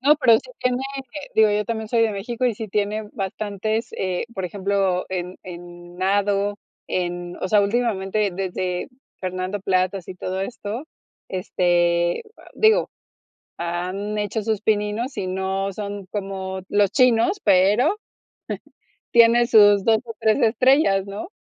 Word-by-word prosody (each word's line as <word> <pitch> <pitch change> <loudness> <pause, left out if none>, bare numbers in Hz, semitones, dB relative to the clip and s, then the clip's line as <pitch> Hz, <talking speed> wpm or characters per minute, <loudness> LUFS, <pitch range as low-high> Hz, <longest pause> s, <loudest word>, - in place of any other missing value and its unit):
No, 290 +3 +5
pero 255 -6 +5
sí - - -14
tiene, 250 0 0 0.2
eh, 270 +2 -8
digo, 220 -1 +5
yo 210 0 +1
también 220 -1 -4
soy 230 0 +2
de 225 - +3
México, 230 +5 -3
y 240 -3 +2
sí 220 +1 -6
tiene 210 +1 -1
bastantes. 205 +3 -3
Eh, 185 -2 -1
por 190 - -3
ejemplo, 195 -1 0
en 180 -1 -4
en 175 0 -10
nado, 200 +2 +1 0.3
en 175 -1 -3
o - - -1
sea, 210 0 +5
últimamente 205 -2 0
desde 180 0 -3 0.3
Fernando 185 +2 -3
Platas 185 -1 0
y 185 - -6
todo 185 +1 -3
esto, 220 +4 -5 0.4
este, 175 - +1
a - - -16
digo, 440 +3 +3 0.7
han 180 +5 -3
hecho 210 +1 -2
sus 220 -1 -1
pininos, 215 +5 0
y 185 - -2
no 190 +1 -2
son 200 -1 -6
como 190 -1 -4
los 205 -1 +2
chinos, 255 - +3
pero 200 - +4 1.2
tiene 235 0 +6
sus 205 -3 +6
2, 225 -1 +4
o, 230 - -8
3 220 +5 +2
estrellas, 245 -3 +4
¿no? 205 - -6
200 Hz, 145 wpm, -22 LUFS, 185-225 Hz, 1.2 s, tiene